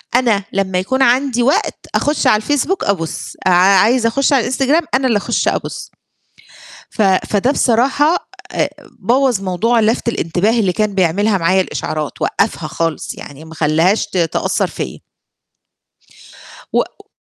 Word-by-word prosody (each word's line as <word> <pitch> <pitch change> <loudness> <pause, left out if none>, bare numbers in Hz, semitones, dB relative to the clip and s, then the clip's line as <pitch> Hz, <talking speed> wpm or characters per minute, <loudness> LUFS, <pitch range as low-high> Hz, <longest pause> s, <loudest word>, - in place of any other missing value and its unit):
أنا 230 -5 +2
لما 190 -1 -1
يكون 260 +9 -1
عندي 250 -1 +2
وقت، 275 +4 0 0.2
أخُش 295 -2 +1
على 250 - +5
الفيسبوك 290 - -1
أبُص، 165 -6 -3
عا 185 - +4 0.2
عايزة 230 +4 +3
أخُش 275 +4 +1
على 270 - +5
الإنستجرام 270 +7 +1
أنا 260 0 +1
اللي 230 -4 +2
أخُش 205 - -1
أبُص. - - -3 1.0
ف - - -1
فده 200 +4 +1
بصراحة 275 +6 +1 0.2
أ - - 0 0.3
بوّظ 250 -3 +1
موضوع 195 +5 +1
لفت 225 +2 0
الانتباه 210 +3 0
اللي 190 -4 +1
كان 210 +2 -1
بيعملها 195 +3 +1
معايا 185 +2 +2
الإشعارات، 155 -4 -5
وقّفها 200 -6 -1
خالص 165 -2 -3
يعني، 145 +2 -11
ما 160 0 -12
خلاهاش 160 +6 +1
ت 205 - -8
تأثّر 165 -2 0
فيّا. 65 - -6 1.7
وق - - -2
215 Hz, 140 wpm, -16 LUFS, 185-255 Hz, 1.7 s, على